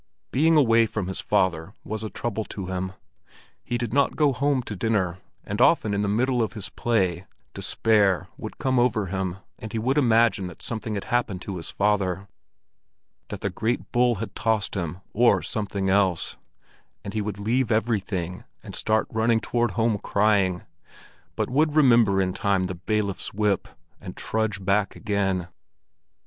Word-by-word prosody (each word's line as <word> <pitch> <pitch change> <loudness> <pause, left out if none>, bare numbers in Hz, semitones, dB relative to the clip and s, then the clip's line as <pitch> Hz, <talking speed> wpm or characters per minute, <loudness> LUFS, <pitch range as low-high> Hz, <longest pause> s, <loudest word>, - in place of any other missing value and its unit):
Being 160 +5 +4
away 115 -5 +5
from 105 -3 -3
his 95 +1 -3
father 80 -3 0
was 110 0 -5
a 110 - -3
trouble 110 -1 -3
to 95 - -6
him. 95 0 -3 0.7
He 120 - -2
did 120 -1 -3
not 140 0 +2
go 145 -3 +3
home 140 0 +1
to 105 - -6
dinner, 95 -3 0 0.2
and - - -3
often 105 - +4
in 100 - 0
the 105 - 0
middle 120 +4 +1
of 110 - -1
his 105 -5 -5
play, 95 -6 0 0.3
despair 100 -5 +2
would 110 - -8
come 130 -3 +1
over 120 -4 +2
him 95 -1 -3 0.2
and 110 - -7
he 115 - -3
would 130 +6 +1
imagine 115 -6 +3
that 90 - -10
something 110 -1 -3
had 100 - -3
happened 115 -7 -1
to 95 -2 -5
his 85 - -5
father, 100 -2 0 1.0
that - - -7
the - - -1
great 115 +3 -2
bull 120 -1 +3
had 110 +2 -6
tossed 110 -2 0
him 90 -1 -4
or 120 +2 +4
something 100 -2 -2
else; 95 -3 +2 0.7
and 100 - -6
he 110 - -1
would 105 -1 -4
leave 115 +4 0
everything, 100 -6 -1 0.2
and - - -8
start 110 0 +1
running 110 +1 +2
homeward 120 -3 +1
crying, 100 -3 +2 0.7
but - - -1
would 150 +3 +1
remember 115 -9 +5
in 90 -1 +1
time 100 -1 +1
the 95 0 -2
bailiff's 100 +1 -2
whip, 105 -3 +1 0.3
and - - -9
trudge 110 -3 -2
back 100 0 +1
again. 95 -3 -1
105 Hz, 165 wpm, -25 LUFS, 95-115 Hz, 1.0 s, away